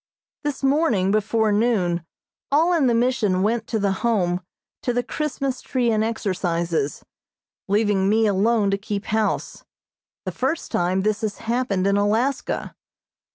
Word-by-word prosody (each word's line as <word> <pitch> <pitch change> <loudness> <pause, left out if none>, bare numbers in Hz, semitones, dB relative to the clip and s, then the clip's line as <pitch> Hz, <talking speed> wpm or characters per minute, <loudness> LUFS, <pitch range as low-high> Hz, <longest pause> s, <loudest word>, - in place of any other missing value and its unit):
This 290 -2 -3
morning, 270 - +2
before 215 +1 +1
noon, 205 -6 +1 0.5
all 325 +5 +4
in 310 -6 +3
the 235 - +3
Mission 230 -6 +1
went 225 +2 0
to 225 - -1
the 200 -2 +1
Home 185 -6 +1 0.4
to 245 - -1
the 245 0 0
Christmas 275 -3 -3
tree 245 -3 0
and 215 -1 +2
exercises, 175 -8 -1 0.6
leaving 205 -1 +2
me 220 +1 +3
alone 205 +1 +2
to 195 - 0
keep 200 0 -4
house, 220 0 -1 0.6
the 185 - -2
first 265 - -2
time 180 +2 +1
this 215 +1 0
has 215 -2 -2
happened 225 -5 -1
in 200 0 +3
Alaska. 220 +7 0
215 Hz, 145 wpm, -23 LUFS, 195-245 Hz, 0.6 s, all